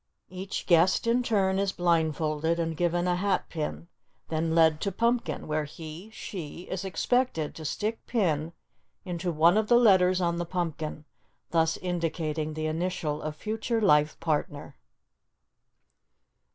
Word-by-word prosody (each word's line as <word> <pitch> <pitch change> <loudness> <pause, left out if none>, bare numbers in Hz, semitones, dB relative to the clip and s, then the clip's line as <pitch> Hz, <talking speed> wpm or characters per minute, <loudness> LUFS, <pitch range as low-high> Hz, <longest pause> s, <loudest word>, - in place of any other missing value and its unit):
Each 190 +2 -5
guest 175 +4 +4
in 235 +2 +3
turn 195 -5 +1
is 200 -1 +1
blindfolded 160 -1 +1
and 165 -1 -1
given 175 +1 0
a 180 - +2
hat 195 0 0
pin, 160 +1 -4 0.4
then 160 0 0
led 160 -2 +4
to 200 - -1
pumpkin, 235 +5 0
where 155 0 -1
he 160 +6 -9
(she) 175 -7 -7
is 190 0 -3
expected 195 - 0
to 160 - -9
stick 215 +9 -2
pin 165 -9 0 0.5
into 175 -1 -2
one 165 +4 +4
of 215 -1 +1
the 240 - +6
letters 185 -5 +5
on 170 -1 0
the - - 0
pumpkin, 160 -3 -4 0.5
thus 165 -1 +2
indicating 160 -3 -2
the 155 0 -3
initial 155 -2 -2
of 155 0 -4
future 220 +5 -2
life 150 -7 +3
partner. 150 -1 -2
170 Hz, 140 wpm, -28 LUFS, 155-190 Hz, 0.5 s, the